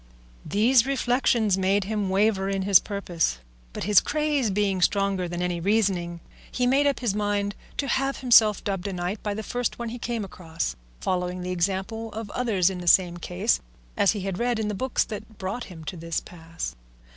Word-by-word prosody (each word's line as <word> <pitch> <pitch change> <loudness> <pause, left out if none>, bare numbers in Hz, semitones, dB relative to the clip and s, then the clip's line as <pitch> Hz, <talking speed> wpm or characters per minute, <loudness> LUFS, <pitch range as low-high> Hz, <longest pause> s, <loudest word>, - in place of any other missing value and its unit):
These 235 +4 +4
reflections 245 -6 +2
made 195 +2 +2
him 205 -1 -2
waver 195 0 +2
in 195 -1 -1
his 195 -1 +7
purpose, 175 - -1 0.3
but - - -5
his 205 +1 +6
craze 300 -5 0
being 195 -1 0
stronger 195 -1 +1
than 175 +1 -3
any 175 -1 -1
reasoning, 180 -3 0 0.3
he 250 - 0
made 275 +3 +3
up 280 - 0
his 235 -6 0
mind 205 -1 0 0.2
to 280 - -1
have 270 +1 0
himself 225 -5 +5
dubbed 195 -1 -2
a 195 - -3
knight 180 +3 -3
by 205 -1 -2
the 220 - -4
first 245 +1 -2
one 235 -1 -4
he 240 +2 -6
came 230 -3 -3
across, 165 - -4 0.2
following 180 - -2
the 180 - -3
example 195 +5 -2
of 220 -1 -6
others 200 -7 +1
in 185 - -5
the 175 - -7
same 175 -1 +5
case, 180 +6 0 0.4
as 205 -1 +3
he 205 - -4
had 190 -1 -3
read 240 0 +1
in 215 -1 -1
the - - -2
books 260 +6 0
that 215 0 -8
brought 195 +6 -4
him 165 -4 -11
to 185 - -5
this 165 0 -3
pass. 165 - -7
200 Hz, 195 wpm, -25 LUFS, 180-225 Hz, 0.4 s, his